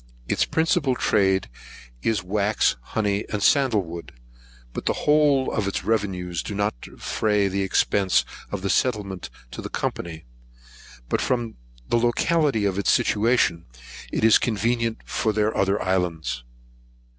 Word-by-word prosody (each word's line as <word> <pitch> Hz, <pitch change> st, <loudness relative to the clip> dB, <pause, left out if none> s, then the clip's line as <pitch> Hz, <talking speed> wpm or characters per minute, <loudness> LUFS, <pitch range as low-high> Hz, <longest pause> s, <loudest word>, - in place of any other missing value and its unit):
Its -, -, +1 dB
principal 160 Hz, -4 st, +1 dB
trade 95 Hz, -, +2 dB, 0.5 s
is 105 Hz, -, 0 dB
wax, 100 Hz, -, +1 dB
honey, 100 Hz, -, -1 dB
and 105 Hz, -2 st, -1 dB
sandlewood; 105 Hz, -, +1 dB, 0.6 s
but -, -, -5 dB
the -, -, +3 dB
whole 150 Hz, -3 st, +4 dB
of 105 Hz, -3 st, -1 dB
its 100 Hz, -, -2 dB
revenues 95 Hz, -6 st, -1 dB
do 105 Hz, -, -6 dB
not 105 Hz, +1 st, 0 dB
defray 105 Hz, -2 st, 0 dB
the 100 Hz, +1 st, -1 dB
expence 95 Hz, 0 st, +2 dB, 0.3 s
of 100 Hz, -2 st, -4 dB
the 100 Hz, -, -1 dB
settlement 100 Hz, -7 st, -1 dB, 0.2 s
to -, -, -6 dB
the -, -, -6 dB
Company; 80 Hz, -4 st, -4 dB, 0.8 s
but -, -, 0 dB
from 120 Hz, -3 st, -1 dB, 0.4 s
the 120 Hz, -, +3 dB
locality 125 Hz, 0 st, +2 dB
of 100 Hz, -1 st, 0 dB
its 100 Hz, -, +2 dB
situation, 105 Hz, -, +2 dB, 0.4 s
it -, -, -2 dB
is 110 Hz, -1 st, +7 dB
convenient 115 Hz, +1 st, 0 dB
for 110 Hz, -, 0 dB
their 105 Hz, +1 st, +1 dB
other 100 Hz, +1 st, +1 dB
islands. 80 Hz, -9 st, -1 dB
105 Hz, 135 wpm, -24 LUFS, 95-115 Hz, 0.8 s, is